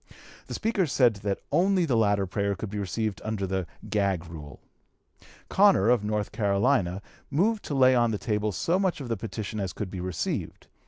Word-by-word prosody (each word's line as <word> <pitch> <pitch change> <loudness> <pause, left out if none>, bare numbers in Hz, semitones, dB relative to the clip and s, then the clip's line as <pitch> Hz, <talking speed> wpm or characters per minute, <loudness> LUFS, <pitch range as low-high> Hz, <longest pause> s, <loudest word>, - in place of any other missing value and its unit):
The - - -5
Speaker 210 -6 0
said 125 -6 +3
that 100 0 -3
only 185 0 +3
the 135 -7 +1
latter 100 -3 +2
prayer 100 +2 -1
could 100 +2 -6
be 105 - -3
received 100 0 -2
under 110 -2 -2
the 95 -2 -2 0.2
"gag" 100 -4 0
rule. 75 -3 -10 0.9
Connor, 100 +4 +4
of 120 -4 +3
North 105 0 -2
Carolina, 100 -2 +1 0.3
(p. 140 - -8
261) 175 +7 +4
moved 225 -2 -2
to 145 - -3
lay 130 -1 +6
on 120 -2 +3
the 110 - -1
table 105 +1 -1
so 170 - 0
much 190 -4 0
of 130 -4 -6
the 115 - 0
petition 110 0 -5
as 95 -4 -3
could 100 -4 -5
be 95 - -5
received. 90 -3 -3
105 Hz, 200 wpm, -27 LUFS, 95-125 Hz, 0.9 s, lay